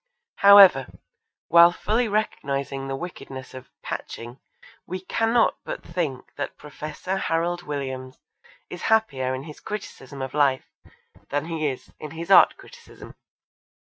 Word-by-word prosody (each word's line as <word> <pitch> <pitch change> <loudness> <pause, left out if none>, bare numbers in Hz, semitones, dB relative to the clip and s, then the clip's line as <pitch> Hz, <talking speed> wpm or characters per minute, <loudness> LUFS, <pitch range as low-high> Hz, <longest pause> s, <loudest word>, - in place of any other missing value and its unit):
However, 195 -9 +8 0.6
while 170 0 +7
fully 220 +6 0
recognising 140 -10 -2
the 135 - -3
wickedness 135 -5 -8
of 130 -1 -11
'patching' 120 +3 -7 0.5
we 185 +1 -5
cannot 225 +5 +1
but - - -6
think 160 -7 -4
that 145 - -5
Professor 155 +5 -5
Harald 175 -1 -1
Williams 130 -4 -5 0.5
is 180 - -9
happier 135 -13 +1
in 130 - -6
his 150 -1 -11
criticism 140 -10 -7
of 130 - -6
life 140 -3 +2 0.6
than 145 +1 -1
he 160 -2 -2
is 130 -3 -6
in 150 - -7
his 165 +4 -6
art - - +7
criticism. 485 -1 -14
150 Hz, 130 wpm, -24 LUFS, 135-185 Hz, 0.6 s, However